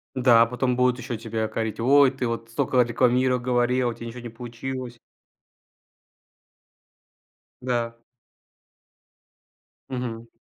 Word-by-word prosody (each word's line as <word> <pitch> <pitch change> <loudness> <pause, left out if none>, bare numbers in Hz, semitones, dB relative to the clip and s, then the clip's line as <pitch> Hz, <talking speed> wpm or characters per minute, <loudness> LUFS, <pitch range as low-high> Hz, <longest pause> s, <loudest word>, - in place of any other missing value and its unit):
Да, 120 -3 +6
а - - +2
потом 125 +1 -1
будут 125 0 +2
ещё 125 - -4
тебя 110 0 -3
корить: 110 0 -3
"Ой, 135 +3 +5
ты 130 -2 -3
вот 115 0 -4
столько 125 +2 0
рекламиро 125 +2 +2
говорил, 125 0 +1
а - - -2
у - - -6
тя 115 - -9
ничего 120 +1 -8
не 120 - -7
получилось". 120 +1 -7 2.6
Да. 120 -2 -2 1.9
Мгм. 120 -3 -5
120 Hz, 120 wpm, -24 LUFS, 115-125 Hz, 2.6 s, Да